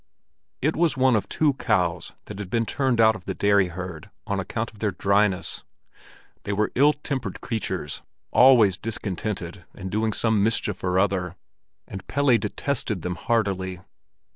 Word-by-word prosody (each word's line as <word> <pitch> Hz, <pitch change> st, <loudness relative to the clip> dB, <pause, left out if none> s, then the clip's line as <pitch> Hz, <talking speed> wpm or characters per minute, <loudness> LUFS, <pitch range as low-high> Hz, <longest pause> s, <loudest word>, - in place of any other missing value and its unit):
It 155 Hz, +3 st, +2 dB
was 160 Hz, -4 st, +1 dB
one 130 Hz, -2 st, +4 dB
of 105 Hz, -2 st, -1 dB
two 150 Hz, -2 st, +2 dB
cows 90 Hz, -9 st, 0 dB
that 105 Hz, -1 st, -8 dB
had 100 Hz, -3 st, -6 dB
been 115 Hz, +1 st, +1 dB
turned 130 Hz, +1 st, 0 dB
out 110 Hz, -1 st, +6 dB
of 95 Hz, -3 st, -11 dB
the -, -, -3 dB
dairy 100 Hz, -2 st, +3 dB
herd 90 Hz, +1 st, -7 dB, 0.2 s
on 100 Hz, -2 st, -1 dB
account 110 Hz, +4 st, -3 dB
of 105 Hz, -, -17 dB
their 105 Hz, -, +1 dB
dryness. 100 Hz, 0 st, +1 dB, 0.8 s
They 100 Hz, -, -3 dB
were 105 Hz, +1 st, 0 dB
ill 145 Hz, +4 st, +5 dB
tempered 130 Hz, -9 st, -4 dB
creatures, 115 Hz, -4 st, -3 dB, 0.3 s
always 115 Hz, -8 st, +6 dB
discontented 100 Hz, -4 st, -3 dB
and 95 Hz, -1 st, -7 dB
doing 110 Hz, +1 st, 0 dB
some 110 Hz, -1 st, +1 dB
mischief 105 Hz, -2 st, 0 dB
or 90 Hz, 0 st, +1 dB
other; 95 Hz, -2 st, 0 dB, 0.5 s
and 95 Hz, -1 st, -8 dB
Pelle 140 Hz, -2 st, +3 dB
detested 105 Hz, -, -1 dB
them 90 Hz, -, -2 dB
heartily. 95 Hz, -3 st, -1 dB
105 Hz, 160 wpm, -24 LUFS, 95-115 Hz, 0.8 s, out